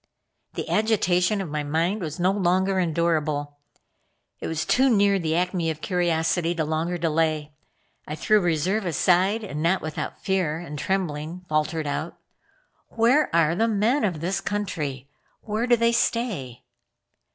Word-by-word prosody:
The - - -4
agitation 205 -3 +2
of 185 - -5
my 150 0 -1
mind 165 +8 -1
was 155 -1 -5
not 185 +3 +2
longer 190 +2 +2
endurable. 155 -4 -1 0.8
I - - -3
was 160 -1 -2
too 265 +1 +3
near 200 -3 +3
the 160 -2 -1
acme 175 -1 0
of 160 -1 -4
curiosity 170 -1 0
to 160 -2 -1
longer 160 +3 -1
delay. 155 -2 0 0.5
I 150 - -4
threw 210 +7 +3
reserve 175 +5 0
aside 185 +6 +2
and 150 -7 -5
not 175 +3 +1
without 155 -1 -5
fear 185 -6 0
and 150 -4 -7
trembling 175 -1 -3
faltered 155 0 -1
out: 145 - -3 0.7
"Where 240 +7 +3
are 165 -1 +3
the 225 +6 +1
men 225 +6 +1
of 175 -7 -1
this 185 +3 -1
country? 150 -10 -3 0.3
Where 220 +2 -2
do 240 - +5
they 230 +1 +3
stay?" 210 - -1
175 Hz, 150 wpm, -24 LUFS, 155-200 Hz, 0.8 s, do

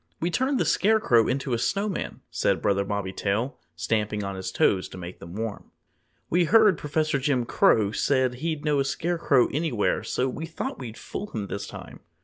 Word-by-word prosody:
"We 170 +2 -1
turned 260 +5 +1
the - - +2
Scarecrow 200 - +3
into 135 0 -1
a 115 - 0
Snowman," 200 - -2
said - - +1
Brother 100 -1 +1
Bobby 100 -1 -3
Tail, 105 +8 -1 0.2
stamping 105 +4 -1
on 100 0 -3
his 95 -1 -5
toes 95 0 +2
to - - -10
make 90 0 -8
them 85 +2 -10
warm. 110 -1 -5 0.6
"We 175 +1 +2
heard 215 0 +6
Professor 150 -1 0
Jim 130 -3 +1
Crow 105 -3 +3
say 130 +3 +2
he'd 155 +2 -3
know 150 -2 +2
a - - +3
Scarecrow 150 -2 +2
anywhere, 145 -8 0
so 130 - -1
we 155 +5 -5
thought 160 - -5
we'd 115 -4 -7
fool 210 - -6
him 110 - -4
this 100 0 -5
time." - - -10
130 Hz, 185 wpm, -26 LUFS, 105-160 Hz, 0.6 s, heard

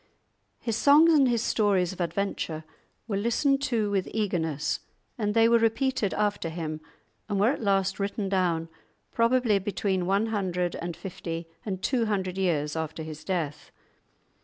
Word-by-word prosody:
His 230 -3 -2
songs 305 +6 +6
and 275 -4 +5
his 235 -2 +1
stories 195 -6 +2
of 185 - -6
adventure 170 -2 -2 0.4
were 205 -3 -1
listened 270 +6 +2
to 220 -4 0
with 195 -2 0
eagerness, 165 -8 -1 0.4
and 210 -2 -1
they 225 0 +6
were 235 0 +5
repeated 225 -1 +1
after 205 -5 0
him, 160 -2 -5 0.5
and 200 -2 0
were 215 +5 +4
at 285 - -4
last 195 -2 +1
written 200 0 -2
down, 175 -4 +1 0.4
probably 230 -3 +3
between 190 -2 -1
one 200 +3 +2
hundred 180 -4 -1
and 170 -1 -5
fifty 165 -3 -6 0.2
and 190 -3 -4
two 240 -4 +1
hundred 190 -3 -1
years 150 -5 0
after 160 0 -4
his 155 -1 -8
death. 160 -6 -3
195 Hz, 155 wpm, -27 LUFS, 170-225 Hz, 0.5 s, songs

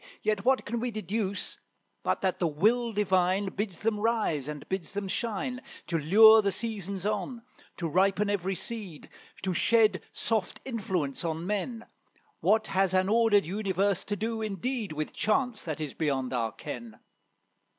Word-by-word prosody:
Yet 210 -2 0
what 260 +1 +3
can 235 +2 -2
we 245 +2 -1
deduce 205 -1 -3 0.4
but - - 0
that 190 -2 0
the 175 - +2
will 225 +10 +2
Divine 190 -1 +2
Bids 195 -3 -4
them 215 -1 +1
rise 210 - 0
and 150 -1 -6
bids 190 -2 -4
them 200 -1 -3
shine, 240 +5 -3 0.2
To 165 - -1
lure 220 +8 +8
the 200 -1 +1
seasons 200 -3 -3
on, 215 +3 -2 0.3
to 170 - -2
ripen 195 +5 +2
every 195 -2 -1
seed, 200 -8 -5 0.3
To 185 -1 0
shed 215 +1 +3
soft 220 -5 -2
influence 185 - -2
on 165 0 -2
men; 210 +4 -2 0.5
What 220 0 +3
has 190 -2 +1
an 185 +1 +3
ordered 220 -4 +4
universe 195 +1 0
to 205 - -2
do 225 +2 -2
indeed, 215 +1 -2
With 155 0 -4
chance, 225 +1 0
that 155 -3 -3
is 150 -3 -4
beyond 135 -5 -1
our 115 -3 0
ken. 115 -2 -8
200 Hz, 160 wpm, -29 LUFS, 175-220 Hz, 0.5 s, lure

